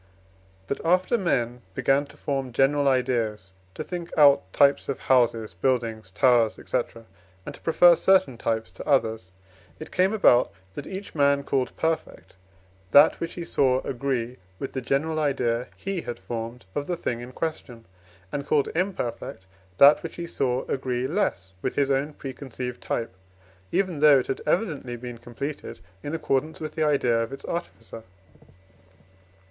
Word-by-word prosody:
But, 140 - -4
after 185 +7 +2
men 125 - 0
began 140 +1 +2
to - - -17
form 135 -3 -3
general 140 +3 +3
ideas, 115 -7 0 0.2
to - - -4
think 175 -2 -6
out 140 -11 +5
types 140 +4 +3
of 140 - -3
houses, 120 -5 +2
buildings, 115 0 -1
towers, 120 +1 +3
&c., 130 - +1 0.7
and - - -6
to - - -14
prefer 170 +1 +6
certain 185 -8 +3
types 110 -4 -2
to 90 - -10
others, 110 -8 +1 0.5
it 155 - -9
came 185 +2 +2
about, 125 - +4 0.2
that 140 - -7
each 195 +1 -7
man 140 -1 +3
called 135 -2 -1
perfect 160 - -3 0.5
that 145 +7 +6
which 170 - -4
he 175 - -5
saw 130 -4 +2
agree 125 -2 -3 0.2
with 135 - -6
the 130 - -3
general 155 +5 0
idea 125 -5 0
he 195 -3 -3
had 120 - -6
formed 115 +4 -6
of 145 - -3
the 175 - -2
thing 120 -7 -3
in 120 +1 -9
question, 125 -6 -5 0.5
and 140 -1 -4
called 145 -2 +2
imperfect 160 - -3 0.3
that 140 +2 +7
which 165 - -7
he 170 - -5
saw 130 -6 -1
agree 130 -2 -2
less 95 - -1
with - - -2
his 140 -1 +2
own 140 +3 0
preconceived 130 -2 -7
type, 115 -5 -3 0.6
even 185 -4 0
though 150 -1 +7
it 130 - 0
had 135 - -3
evidently 150 - -1
been 120 0 -8
completed 120 0 -6 0.2
in 145 +3 -4
accordance 155 0 -1
with 155 -1 -5
the 160 - -4
idea 125 -6 +2
of 115 - -3
its 135 - -8
artificer. 115 -9 -6
135 Hz, 160 wpm, -25 LUFS, 120-155 Hz, 0.7 s, that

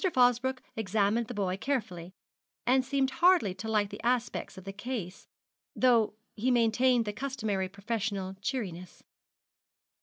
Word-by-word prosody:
Fosbroke 250 +1 +3
examined 215 +2 +1
the 245 - -5
boy 190 -3 0
carefully, 190 -8 -3 0.5
and 260 +2 +4
seemed 270 0 0
hardly 340 - +4
to 220 - -7
like 210 -2 +1
the 205 - -7
aspect 245 -3 -1
of 190 - -9
the 195 +1 -7
case, 205 -4 -5 0.5
though 235 -4 +3 0.2
he 230 +4 0
maintained 240 0 +3
the 210 - -3
customary 220 -7 -2
professional 200 -1 -3
cheeriness. 185 - -4
220 Hz, 130 wpm, -30 LUFS, 200-255 Hz, 0.5 s, and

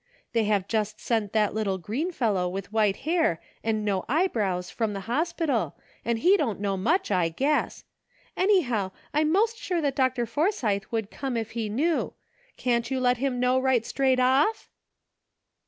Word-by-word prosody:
They 230 -2 +2
have 205 -2 +1
just 215 -1 -1
sent 220 -4 -1
that 215 -2 +2
little 205 -3 -1
green 245 - -3
fellow 205 - 0
with 195 +3 -6
white 210 -3 +3
hair 320 - +2 0.2
and 220 -1 0
no 195 -3 0
eyebrows 215 - 0
from 225 -3 -1
the 195 - -4
hospital, 300 - -1 0.3
and 235 -1 0
he 370 - +4
don't 240 - -1
know 200 -1 -1
much, 320 - +1
I 180 -4 +2
guess. 275 - 0 0.5
Anyhow, 250 - +2 0.2
I'm 305 +1 +2
most 445 +5 +2
sure 355 -2 -1
that 285 -4 0
Dr. 255 -2 +1
Forsythe 235 - 0
would 225 -3 -3
come 265 -4 -3
if 225 -1 -3
he 225 -2 -3
knew. 305 +10 0 0.4
Can't 235 -2 0
you 265 - -1
let 250 -1 +2
him 260 -1 -1
know 250 +1 +3
right 260 -3 +2
straight 265 -2 +1
off 265 - +2
235 Hz, 170 wpm, -26 LUFS, 210-290 Hz, 0.5 s, he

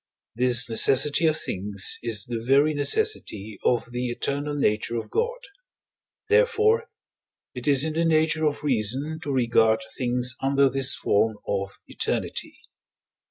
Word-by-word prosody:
this 125 0 +3
necessity 135 +7 +3
of 155 -1 +1
things 100 -7 -1
is 110 -4 -1
the 120 -1 -4
very 140 +5 +3
necessity 145 - -1
of 120 -2 +1
the 125 +1 -3
eternal 145 +4 -3
nature 115 -4 -1
of 115 - -5
God; 480 +2 -1 0.9
therefore, 455 0 +2 0.6
it 125 0 -7
is 140 0 +5
in 160 - -3
the 165 +2 0
nature 160 -1 +2
of 145 0 -3
reason 135 +4 -1
to 145 - -4
regard 115 -3 +2
things 125 -1 -1
under 135 0 +2
this 135 0 +2
form 110 +2 0
of 100 -1 -3
eternity. - - -3
135 Hz, 135 wpm, -24 LUFS, 115-155 Hz, 0.9 s, is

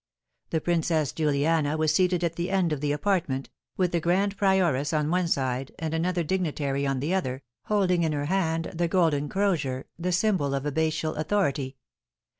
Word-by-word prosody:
The 160 - 0
Princess 165 -3 +1
Juliana 155 0 +1
was 155 -1 +2
seated 180 -2 +2
at 170 -1 0
the 175 +1 -2
end 185 -4 +1
of 145 - -4
the 145 -1 0
apartment, 150 -5 -1 0.3
with 180 -2 +1
the 170 - +1
grand 190 +5 +1
prioress 175 -8 +2
on 150 0 +1
one 180 0 +1
side 130 -3 -1
and 160 -1 -3
another 175 +2 0
dignitary 145 -5 -1
on 135 -2 -1
the 155 +6 -1
other, 130 -8 -2 0.2
holding 190 -4 +2
in 160 -2 +1
her 145 -1 -2
hand 165 -1 0
the 170 0 0
golden 160 -5 +1
crozier, 155 -10 0
the 180 +2 -1
symbol 180 -7 +1
of 135 - -2
abbatial 155 +2 0
authority. 150 -6 0
160 Hz, 175 wpm, -26 LUFS, 145-180 Hz, 0.3 s, was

